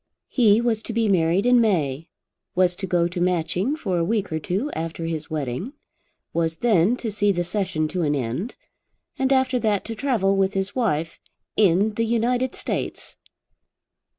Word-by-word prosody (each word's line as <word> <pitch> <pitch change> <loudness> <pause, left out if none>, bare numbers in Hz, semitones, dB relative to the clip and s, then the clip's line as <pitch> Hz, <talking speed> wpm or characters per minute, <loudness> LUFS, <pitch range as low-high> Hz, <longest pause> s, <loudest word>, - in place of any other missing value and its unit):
He 225 -3 +4
was 230 -2 0
to 230 - -6
be 225 -1 +1
married 180 +1 +2
in 245 -1 +5
May, 160 - 0 0.5
was 180 -1 +3
to 195 - -4
go 175 -2 +2
to 175 0 -4
Matching 180 - 0
for 190 - -2
a - - +1
week 205 +1 -1
or 160 - -1
two 200 - -2
after 165 +1 -4
his 160 -2 -4
wedding, 150 - -3 0.6
was 165 -1 0
then 210 +2 +3
to 225 -3 -3
see 205 0 +2
the 175 -2 0
Session 175 -4 -1
to 180 +1 -2
an 150 -2 +1
end, 135 - -3 0.6
and 265 0 +1
after 260 -1 +3
that 210 -4 0
to 230 - -4
travel 220 -6 +1
with 195 0 +1
his 195 +1 -2
wife 165 -10 -1 0.4
in 205 +1 +3
the 230 - 0
United 245 +3 0
States. - - -4
195 Hz, 175 wpm, -23 LUFS, 165-230 Hz, 0.6 s, in